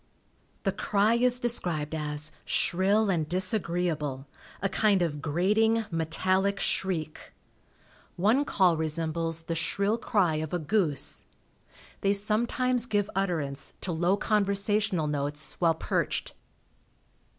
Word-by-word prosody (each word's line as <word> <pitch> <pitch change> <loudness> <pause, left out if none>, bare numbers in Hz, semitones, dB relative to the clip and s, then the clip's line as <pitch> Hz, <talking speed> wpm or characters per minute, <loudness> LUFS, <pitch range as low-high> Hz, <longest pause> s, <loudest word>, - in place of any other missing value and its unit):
The - - +1
cry 210 +2 +1
is 245 +1 +3
described 175 -11 0
as 150 0 -2
"shrill 195 +4 +1
and 160 -4 -1
disagreeable, 175 -7 0 0.3
a 195 - 0
kind 200 -2 +2
of 150 -4 -3
grating, 210 +9 +1
metallic 185 +5 0
shriek." 165 -5 -3 0.8
One 220 +10 +3
call 185 - +2
resembles 165 +1 -2
the 165 - -3
shrill 200 +7 0
cry 190 -9 +1
of 155 +2 -3
a - - +2
goose. 160 -3 0 0.8
They 200 0 +2
sometimes 235 +4 +1
give 205 -3 0
utterance 160 -8 -1
to 185 - -2
low 175 +4 +1
conversational 205 -3 +1
notes 145 0 -1
while 165 -2 +3
perched. - - -2
180 Hz, 115 wpm, -28 LUFS, 160-205 Hz, 0.8 s, is